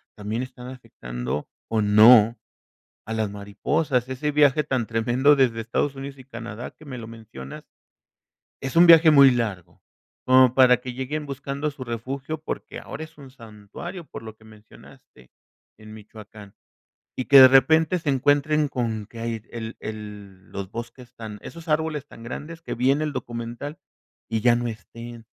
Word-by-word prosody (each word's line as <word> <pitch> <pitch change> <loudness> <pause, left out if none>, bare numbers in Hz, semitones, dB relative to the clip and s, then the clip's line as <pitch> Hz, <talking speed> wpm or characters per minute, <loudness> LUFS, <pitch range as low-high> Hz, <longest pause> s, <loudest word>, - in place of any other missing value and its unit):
también 110 +3 -4
están 125 -1 -10
afectando 70 - -6 0.2
o 110 -1 +1
no 110 +2 +6 0.7
a 110 - -4
las 110 -2 -1
mariposas. 125 +6 -1
Ese 140 +3 -3
viaje 150 0 +3
tan 130 -5 -1
tremendo 120 +6 +2
desde 120 -4 +1
Estados 135 +5 -2
Unidos 135 0 -8
y - - -12
Canadá, 120 -2 -8
que 155 - -18
me 130 -3 -7
lo 110 - -9
mencionas, 110 -13 -11 1.0
es 135 +2 -4
un 175 +1 +8
viaje 165 -1 +8
muy 140 -2 +8
largo, 100 -8 -4 0.4
como 130 -1 +6
para 125 -2 +6
que 125 0 -7
lleguen 145 +4 -4
buscando 140 +2 -4
su 135 -2 -9
refugio, 130 +6 -5
porque 155 - -6
ahora 160 - -7
es 160 -1 -17
un 135 -2 -12
santuario, 115 - -10
por - - -10
lo 110 -1 -9
que 110 - -22
mencionaste, 105 - -18 0.5
en 110 0 -13
Michoacán, 105 -1 -13 0.6
y 130 - -1
que 140 -1 +9
de 130 - +11
repente 160 +6 +4
se 155 -3 -2
encuentren 145 +3 +2
con 115 -6 -3
que 115 - -13
hay 115 -2 -4
el 115 -1 -7
el 105 -3 -9
los 100 -1 -6
bosques 120 +2 -9
tan 110 -2 -8
esos 165 -1 -10
árboles 155 -2 -1
tan 115 - -14
grandes 160 +7 -8
que - - -5
vi 125 +3 +2
en 140 +2 +1
el 150 -1 -2
documental 120 +6 -6 0.5
y 115 -1 -1
ya 120 -1 +5
no 120 0 -2
estén. 115 +1 -10
120 Hz, 170 wpm, -24 LUFS, 110-140 Hz, 1.0 s, de